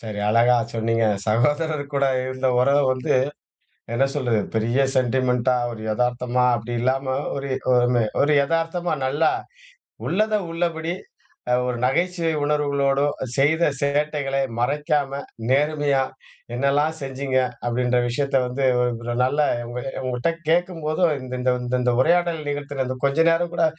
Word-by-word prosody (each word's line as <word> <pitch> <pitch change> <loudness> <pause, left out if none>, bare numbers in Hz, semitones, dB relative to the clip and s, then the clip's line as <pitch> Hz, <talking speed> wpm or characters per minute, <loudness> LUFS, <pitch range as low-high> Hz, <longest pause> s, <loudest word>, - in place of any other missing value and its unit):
சரி 105 -2 -6
அழகா 120 +3 +4 0.2
சொன்னீங்க. 115 0 +1 0.2
சகோதரர் 145 +7 +1
கூட 140 - +2 0.2
இருந்த 130 0 -1
உறவ 140 +2 +4
வந்து 130 -1 -1 0.8
என்ன 135 - +3
சொல்றது, 120 -6 +1
பெரிய 115 +4 +1 0.2
சென்டிமென்ட் 125 -1 +1
டா, 125 - +4 0.2
ஒரு 110 - -8
எதார்த்தமா 125 +2 0
அப்டி 120 +2 -5
இல்லாம 130 +2 0 0.3
ஒரு, 140 0 -4 0.2
ஒமே 120 -1 +3 0.2
ஒரு 145 +2 +3
எதார்த்தமா 165 +3 -1
நல்லா, 150 +4 +2 0.8
உள்ளத 215 +3 +1 0.2
உள்ளபடி 165 0 -2 0.6
அ, - - +5
ஒரு 125 -1 -2
நகைச்சுவை 170 +4 +1
உணர்வுகளோடும், 145 -1 +1 0.2
செய்த 160 +5 +3
சேட்டைகளை 140 -1 0 0.2
மறைக்காம, 140 +1 0 0.3
நேர்மையா, 145 0 +2 0.5
என்னெல்லாம் 140 +4 +1
செஞ்சீங்க 135 -1 -2 0.3
அப்டின்ற 125 +1 +1
விஷயத்த 135 +3 -1
வந்து 130 +2 -2 0.6
நல்ல 140 +4 +1 0.3
உங்ககிட்ட 125 +2 -3 0.2
கேட்கும்போது 165 -1 0 0.2
இந்த, 130 0 -6
இந்த, 125 0 -1
இந்த 125 0 +2
உரையாடல் 170 +3 +2
நிகழ்த்தன 145 -2 -3 0.2
கொஞ்ச 140 +4 +3
நேரம் 170 +1 0
கூட 170 - +2
135 Hz, 120 wpm, -23 LUFS, 125-150 Hz, 0.8 s, அ